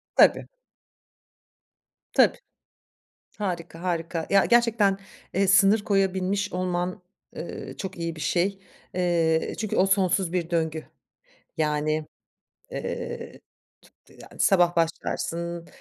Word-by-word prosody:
Tabii. -, -, +5 dB, 1.7 s
Tabii. -, -, +5 dB, 1.0 s
Harika, 175 Hz, -4 st, -4 dB
harika. 165 Hz, -2 st, -2 dB
Ya, 195 Hz, -1 st, +5 dB
gerçekten, 230 Hz, -5 st, +3 dB, 0.4 s
eee, 195 Hz, +1 st, +2 dB
sınır 195 Hz, +3 st, +5 dB
koyabilmiş 195 Hz, 0 st, 0 dB
olman, 180 Hz, 0 st, -2 dB, 0.4 s
ııı, -, -, -7 dB
çok 190 Hz, -1 st, -6 dB
iyi 170 Hz, -1 st, -3 dB
bir 155 Hz, -, -8 dB
şey. 190 Hz, +4 st, 0 dB, 0.4 s
Eee, 170 Hz, -3 st, +1 dB
çünkü 215 Hz, -2 st, -2 dB
o 185 Hz, -, +4 dB
sonsuz 190 Hz, -2 st, +2 dB
bir 170 Hz, -2 st, -1 dB
döngü. 160 Hz, -2 st, -1 dB, 0.7 s
Yani, 155 Hz, 0 st, 0 dB, 0.7 s
eee, 480 Hz, -1 st, -5 dB, 0.7 s
t -, -, -19 dB
yani -, -, -15 dB
sabah 175 Hz, -3 st, +4 dB
başlarsın 170 Hz, +1 st, -2 dB
180 Hz, 100 wpm, -26 LUFS, 165-195 Hz, 1.7 s, Tabii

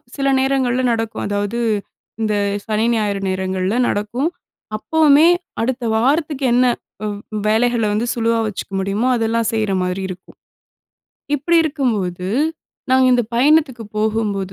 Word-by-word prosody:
சில 275 Hz, -1 st, -1 dB
நேரங்கள்ல 260 Hz, -2 st, +1 dB
நடக்கும். 225 Hz, -1 st, -2 dB
அதாவது, 205 Hz, +3 st, -2 dB, 0.6 s
இந்த 215 Hz, -1 st, 0 dB, 0.3 s
சனி, 215 Hz, +1 st, 0 dB
ஞாயிறு 205 Hz, -2 st, -1 dB
நேரங்கள்ல 185 Hz, +2 st, -1 dB
நடக்கும். 235 Hz, +10 st, -1 dB, 0.5 s
அப்பவுமே 310 Hz, +4 st, +4 dB, 0.3 s
அடுத்த 250 Hz, +1 st, -2 dB
வாரத்துக்கு 285 Hz, +3 st, +1 dB
என்ன? 250 Hz, +1 st, +4 dB, 0.4 s
வ் 205 Hz, -1 st, -3 dB, 0.3 s
வேலைகள 230 Hz, +1 st, +2 dB
வந்து 220 Hz, +3 st, 0 dB
சுலுவா 230 Hz, 0 st, +1 dB
வச்சுக்க 200 Hz, -1 st, -6 dB
முடியுமோ, 200 Hz, +6 st, 0 dB
அதெல்லாம் 225 Hz, 0 st, 0 dB
செய்ற 215 Hz, -3 st, 0 dB
மாரி 180 Hz, +1 st, -2 dB
இருக்கும். 180 Hz, 0 st, -10 dB, 1.0 s
இப்படி 335 Hz, +5 st, +1 dB
இருக்கும்போது, 210 Hz, -, -1 dB, 0.6 s
நாங்க 260 Hz, 0 st, +5 dB
இந்தப் 240 Hz, -2 st, 0 dB
பயணத்துக்கு 270 Hz, -3 st, +3 dB
போகும்போது 210 Hz, -3 st, -1 dB
225 Hz, 120 wpm, -19 LUFS, 205-260 Hz, 1.0 s, நாங்க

